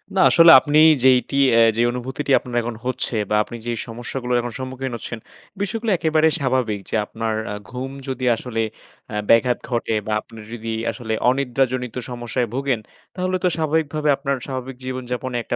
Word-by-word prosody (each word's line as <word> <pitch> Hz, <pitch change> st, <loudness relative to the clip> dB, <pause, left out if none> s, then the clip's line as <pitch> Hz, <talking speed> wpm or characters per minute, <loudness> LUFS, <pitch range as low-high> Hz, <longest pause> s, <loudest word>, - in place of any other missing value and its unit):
না -, -, +2 dB
আসলে 165 Hz, -1 st, +8 dB
আপনি 145 Hz, +3 st, 0 dB, 0.3 s
যেইটি 130 Hz, +1 st, +4 dB, 0.2 s
অ্যা 115 Hz, -, +6 dB, 0.2 s
যেই 120 Hz, -, +3 dB
অনুভূতিটি 130 Hz, +3 st, -4 dB
আপনার 125 Hz, -1 st, -8 dB
এখন 115 Hz, 0 st, -5 dB
হচ্ছে 130 Hz, -1 st, -2 dB
বা 105 Hz, -, +1 dB
আপনি 120 Hz, -, -10 dB
যে -, -, 0 dB, 0.2 s
সমস্যাগুলোর 120 Hz, +2 st, -3 dB
এখন 120 Hz, 0 st, -5 dB
সম্মুখীন 130 Hz, 0 st, -5 dB
হচ্ছেন, 115 Hz, +1 st, -6 dB, 0.4 s
বিষয়গুলো 220 Hz, +2 st, -1 dB
একেবারে 160 Hz, 0 st, +3 dB
স্বাভাবিক। 130 Hz, -6 st, 0 dB
যে -, -, -2 dB
আপনার 110 Hz, +1 st, -3 dB, 0.2 s
আ -, -, -4 dB
ঘুম 130 Hz, +2 st, -5 dB, 0.2 s
যদি 130 Hz, -1 st, -3 dB
আসলে 115 Hz, -1 st, -3 dB, 0.5 s
আ -, -, -3 dB
ব্যাঘাত 120 Hz, +1 st, +4 dB
ঘটে 115 Hz, -2 st, -1 dB
বা 110 Hz, -, 0 dB
আপনি 115 Hz, 0 st, -14 dB
যদি 115 Hz, -1 st, -5 dB, 0.2 s
আসলে 110 Hz, -3 st, -5 dB, 0.2 s
অনিদ্রাজনিত 130 Hz, -2 st, 0 dB
সমস্যায় 120 Hz, 0 st, -2 dB
ভোগেন, 135 Hz, -3 st, 0 dB, 0.4 s
তাহলে 185 Hz, 0 st, -1 dB
তো 180 Hz, -, +4 dB
স্বাভাবিকভাবে 155 Hz, -1 st, 0 dB
আপনার 140 Hz, -1 st, -1 dB
স্বাভাবিক 130 Hz, -1 st, -5 dB
জীবনযাপনে 130 Hz, 0 st, -4 dB
একটা -, -, -3 dB
130 Hz, 165 wpm, -21 LUFS, 120-140 Hz, 0.5 s, আসলে